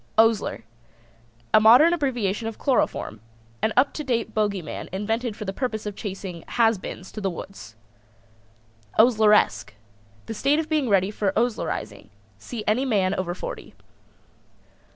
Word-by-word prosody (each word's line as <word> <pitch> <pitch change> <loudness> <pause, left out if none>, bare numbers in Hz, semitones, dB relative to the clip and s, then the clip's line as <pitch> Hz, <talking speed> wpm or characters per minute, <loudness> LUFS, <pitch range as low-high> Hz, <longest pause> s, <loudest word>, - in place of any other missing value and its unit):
OSLER. 225 - +2 0.9
A - - +8
modern 245 +10 +7
abbreviation 240 - -1
of 225 - -6
chloroform. 250 - 0 0.4
An 220 - +1
up 265 +3 +4
to 300 - -4
date 230 -4 -1
bogie 205 -4 0
man 155 - -7
invented 220 +4 -2
for 215 - -7
the 195 - -3
purpose 220 -2 -3
of 205 -1 -4
chasing 190 -5 -6
"has 225 -4 +2
beens" 180 0 -8
to 215 - -7
the 195 - 0
woods. 165 - -9 1.2
OSLERESQUE. 210 - +4 0.5
The 225 - -5
state 280 +7 +2
of 320 -1 -1
being 300 -6 +1
ready 195 -1 +3
for 205 -2 -1
Oslerizing. 110 - -2 0.3
See 225 - -6
any 220 +5 +2
man 200 -8 +1
over 175 -1 -3
forty. - - -7
215 Hz, 145 wpm, -24 LUFS, 190-240 Hz, 1.2 s, A